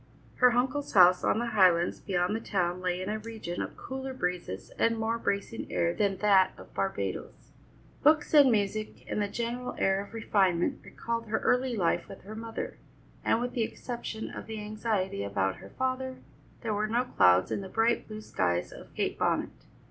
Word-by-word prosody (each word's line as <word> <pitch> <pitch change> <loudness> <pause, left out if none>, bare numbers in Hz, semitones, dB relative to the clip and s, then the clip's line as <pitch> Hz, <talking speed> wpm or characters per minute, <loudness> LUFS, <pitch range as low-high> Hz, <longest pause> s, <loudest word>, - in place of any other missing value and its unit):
Her 250 -1 +6
uncle's 265 +4 0
house 180 -2 +7
on - - +2
the 235 - 0
highlands 180 -4 +4
beyond 180 0 0
the - - -1
town 180 -5 -1
lay 180 0 -1
in - - -6
a 215 +1 -2
region 215 -6 -5
of - - -5
cooler 265 0 -6
breezes 180 - -3
and 230 0 +3
more 225 +1 -1
bracing 200 +2 -2
air 170 0 +1
than 200 -1 0
that 195 -2 +4
of - - -13
Barbadoes. - - -3 0.5
Books 305 0 +4
and 285 -4 +8
music 215 0 -1
and 210 - -1
the 205 - +1
general 240 +4 -3
air 195 +1 +2
of 205 - -13
refinement 190 -5 +1
recalled 230 0 -4
her 220 +1 0
early 250 0 +2
life 175 -6 +1
with 195 - -10
her 205 +3 -8
mother, 225 +1 -6 0.4
and 225 - +2
with 245 +1 -3
the 240 - -1
exception 225 0 -4
of - - -8
the 220 -1 -5
anxiety 210 - -2
about 95 -1 -1
her - - -12
father, 260 0 -2 0.5
there 225 -3 -1
were 210 +1 0
no 235 +3 +1
clouds 90 - +4
in - - -1
the 190 - -7
bright 225 +3 +1
blue 215 0 -7
skies 90 - -1
of - - -12
Kate - - -1
Bonnet. - - +1
215 Hz, 185 wpm, -29 LUFS, 185-235 Hz, 0.5 s, and